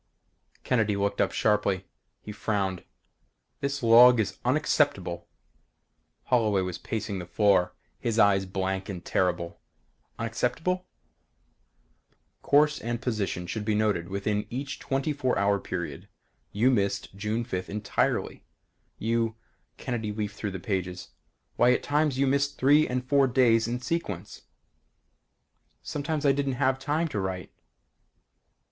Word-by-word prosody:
Kennedy 110 -5 +1
looked 100 0 0
up - - +1
sharply. 100 -3 +1 0.4
He 105 - -7
frowned. 100 -3 -2 0.8
"This 140 -1 -3
log 120 +1 +8
is 100 -3 -2
unacceptable." 120 - +1 1.0
Holloway 110 -6 +2
was 90 -2 -4
pacing 105 -3 -4
the 90 - -7
floor, 90 0 +2 0.2
his 115 -2 -2
eyes 100 -3 +4
blank 95 +1 -2
and 90 -3 -6
terrible 90 -2 -1 0.6
"Unacceptable?" 125 +11 -1 1.5
"Course 150 +1 +3
and 120 +1 -3
position 105 -8 -2
should 105 +5 -4
be 105 0 0
noted 105 -5 0
within 105 +2 -2
each 135 +4 -5
twenty 135 +2 -1
four 130 -3 0
hour 100 0 +2
period. 85 -7 -5 0.4
You 115 +6 +3
missed 100 -4 -1
June 105 +4 -2
5th 95 -6 -4
entirely. 105 0 -1 0.5
You 115 0 0 0.2
" - - -45
Kennedy 115 -4 -3
leafed 105 -1 -4
through 105 - -3
the 95 -1 -6
pages. 90 -2 -3 0.5
"Why 125 +1 +5
at - - -1
times 145 -2 +1
you 140 - +3
missed 140 +1 +1
three 145 +4 +5
and 125 0 -2
four 140 0 +4
days 120 -3 +3
in 120 +1 -2
sequence!" 125 - -4 1.4
"Sometimes 150 +1 -3
I 140 - +6
didn't 140 -1 0
have 130 0 +1
time 150 +5 0
to 105 - -3
write." 95 -2 -4
110 Hz, 130 wpm, -27 LUFS, 100-130 Hz, 1.5 s, log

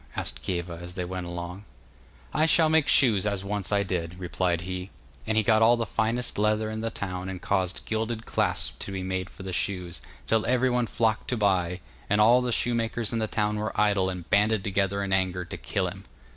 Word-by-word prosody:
asked - - -4
Kieva 85 -2 -3
as 90 +1 -8
they 90 - -2
went 90 0 -5
along. 85 +3 -6 0.7
'I 155 +1 +3
shall 160 -1 +5
make 160 -2 +4
shoes 110 -7 +4
as 100 -2 -1
once 100 -1 -2
I 100 -1 +3
did,' 90 -2 -3
replied 90 -1 -1
he; 90 +1 -5 0.4
and 110 0 +1
he 110 - +4
got 110 +1 +4
all 120 +2 +6
the 115 - -1
finest 115 +2 -1
leather 110 +1 +1
in 110 0 -4
the 115 - -1
town 95 -4 -4
and 95 -1 -5
caused 95 -1 -1
gilded 110 +1 -2
clasps - - -1
to - - -6
be 95 -1 -3
made 95 -1 -2
for - - -11
the 95 -1 -5
shoes, 90 -2 -2 0.2
till 110 -1 +2
everyone 125 -1 +2
flocked 110 -1 0
to 125 - -1
buy, 90 -4 +1 0.3
and 105 - +3
all 120 +4 +6
the 125 -1 -1
shoemakers 115 -1 0
in 115 - 0
the 110 - 0
town 105 0 0
were 105 -1 -3
idle 100 -3 +3
and 90 -3 -6
banded 105 0 +3
together 100 0 0
in 95 -1 -1
anger 90 -1 0
to - - -7
kill 95 -2 -2
him. 95 +2 -7
100 Hz, 215 wpm, -27 LUFS, 90-110 Hz, 0.7 s, all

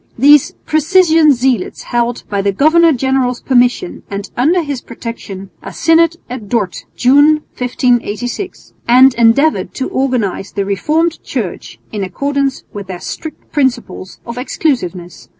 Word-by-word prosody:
These 285 +3 +5
"precisian" 320 0 +4
zealots 250 -5 -1
held, 240 0 -1
by 200 -1 -1
the 200 0 +1
governor 320 - +4
general's 265 -2 0
permission 250 +7 +1
and 200 0 -6
under 330 +8 +2
his 285 -4 -4
protection, 200 -5 -8
a - - -8
synod 330 0 +3
at 235 -5 -8
Dort, 205 -7 -2
June, 290 +4 +4 0.2
1586, 245 - -2
and 255 +2 +6
endeavoured 240 +7 +2
to 265 - -3
organise 245 -8 -1
the 200 -1 -2
Reformed 310 - 0
Church - - -5
in 210 -2 -3
accordance 275 +7 -2
with 200 -2 -7
their 185 -2 -6
strict 315 - -8
principles 250 -9 -2
of 235 +1 -6
exclusiveness. 185 - -3
250 Hz, 130 wpm, -15 LUFS, 220-295 Hz, 0.2 s, and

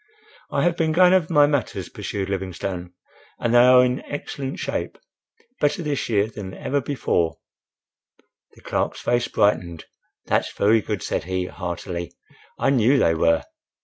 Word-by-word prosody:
—"I - - 0
have 175 -1 +1
been 160 -1 +1
going 180 +2 +6
over 180 -3 +2
my 145 -2 +6
matters," 145 -5 -1
pursued 100 -1 -4
Livingstone, 95 -2 -4 0.5
"and 115 - -1
they 120 - +7
are 125 +1 +7
in 125 +1 -1
excellent 140 -1 -5
shape—better 175 - -4
this 145 -5 -2
year 105 -3 +3
than 105 -3 -8
ever 140 +1 -1
before—" 115 - -1 1.2
The - - -18
clerk's - - -2
face 120 0 +1
brightened. 85 -5 0 0.4
"That's - - 0
very 110 +2 +3
good," 105 -6 -4
said - - -2
he, 95 0 -2
heartily. 85 -2 -5 0.4
"I - - +2
knew 130 +1 +4
they 80 - +3
were." 80 -1 +2
115 Hz, 145 wpm, -23 LUFS, 95-145 Hz, 1.2 s, they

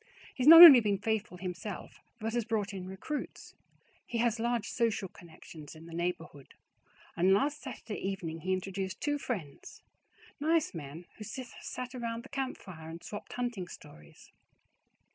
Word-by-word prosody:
He - - -6
has 255 - +2
not 330 +2 +13
only 290 -7 +12
been 205 -3 0
faithful 210 -2 -2
himself, 185 +2 -7 0.2
but 225 +1 -4
has 240 -1 0
brought 210 -2 -2
in 185 -1 -6
recruits. 190 +11 -6 0.5
He 235 - -3
has 235 -1 +1
large 235 -1 -1
social 230 -5 -1
connections 160 -3 -13
in 160 +1 -13
the 165 - -11
neighborhood, 165 -5 -5 0.6
and 185 +3 +4
last 290 +8 0
Saturday 240 -5 -7
evening 175 -4 -4
he 185 +4 -3
introduced 190 +1 -3
two 290 0 -1
friends, 175 - -6 0.6
nice 320 +1 +1
men 160 +1 -8
who 215 - -8
sat 250 +2 -7
around 235 -2 -4
the 270 - -14
campfire 195 - -6
and 165 +1 -9
swapped 205 - -8
hunting 240 -7 -3
stories. 75 - -14
205 Hz, 155 wpm, -31 LUFS, 175-240 Hz, 0.6 s, not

